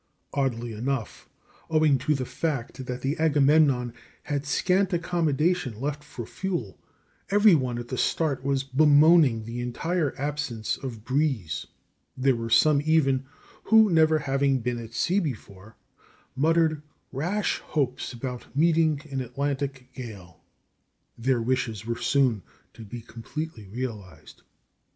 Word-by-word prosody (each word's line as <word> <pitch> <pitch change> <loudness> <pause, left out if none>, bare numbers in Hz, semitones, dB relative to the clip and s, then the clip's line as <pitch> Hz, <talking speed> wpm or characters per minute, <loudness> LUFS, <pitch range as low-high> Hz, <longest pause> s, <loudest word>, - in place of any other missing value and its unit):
Oddly 120 -4 -1
enough, 125 +2 -4 0.4
owing 155 -4 +3
to 150 +4 +1
the 130 -2 -3
fact 130 -4 -4
that 125 0 -4
the 135 +3 0
Agamemnon 145 -5 +3 0.3
had 145 -1 -3
scant 185 +5 +2
accommodation 165 -6 0
left 145 +2 -3
for 120 -5 -8
fuel, 175 - -4 0.5
every 205 0 +6
one 130 -6 +1
at 120 0 -6
the 130 - -3
start 150 -5 0
was 135 -1 0
bemoaning 145 -3 +5
the 115 +2 -5
entire 155 +6 -1
absence 140 -6 -2
of 115 -5 -7
breeze. 130 - -1 0.5
There 130 0 +3
were 115 0 -4
some 140 +5 +5
even, 135 -4 +2 0.4
who, 220 -2 +6
never 160 -1 +4
having 135 -2 +1
been 120 0 -2
at 115 0 -9
sea 185 +11 +2
before, 110 - -7 0.6
muttered 160 +1 +2 0.3
rash 180 +10 -1
hopes 135 -5 -2
about 125 0 -6
meeting 160 -2 +3
an 135 -1 -2
Atlantic 135 +1 -3
gale. 100 -10 -10 0.7
Their 120 0 0
wishes 115 -4 -1
were 115 0 -3
soon 130 -7 +2 0.3
to 115 - -11
be 115 +3 -8
completely 120 +1 -7
realized. 105 -5 -7
135 Hz, 130 wpm, -26 LUFS, 120-155 Hz, 0.7 s, every